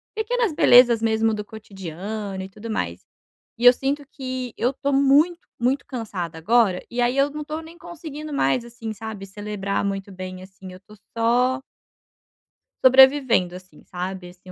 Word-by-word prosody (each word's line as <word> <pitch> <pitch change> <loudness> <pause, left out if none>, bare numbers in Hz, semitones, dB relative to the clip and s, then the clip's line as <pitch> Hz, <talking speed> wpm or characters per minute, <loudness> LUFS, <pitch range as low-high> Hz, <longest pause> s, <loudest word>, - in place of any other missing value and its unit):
pequenas 450 -2 0
belezas 245 -5 +6
mesmo 225 0 +1
do 210 -1 -4
cotidiano 195 -1 -7
e 190 - -8
tudo 215 +3 -8
mais. 90 - -3 0.5
E 240 - -2
eu 245 - +11
sinto 280 +3 -2
que 255 -3 -5
eu 250 +4 0
tô 280 +1 -2
muito 285 +6 +3
muito 255 +4 0
cansada 195 - -5
agora 200 0 +2
e 240 - -4
aí 245 +2 +1
eu 280 +1 +3
não 300 0 -5
tô 310 +1 -5
nem 325 +1 -13
conseguindo 310 -3 -8
mais, 235 - +1
assim 230 -2 -7
sabe, 215 -2 -7
celebrar 200 0 -3
muito 195 0 -4
bem, 185 -1 -8
assim, 190 0 -12
eu 185 - -11
estou 210 +2 -18 0.2
só 250 +3 +2 1.2
sobrevivendo, 260 -8 +5
assim 185 -4 -14
sabe, 180 0 -6
assim, 185 +1 -15
225 Hz, 160 wpm, -23 LUFS, 190-265 Hz, 1.2 s, eu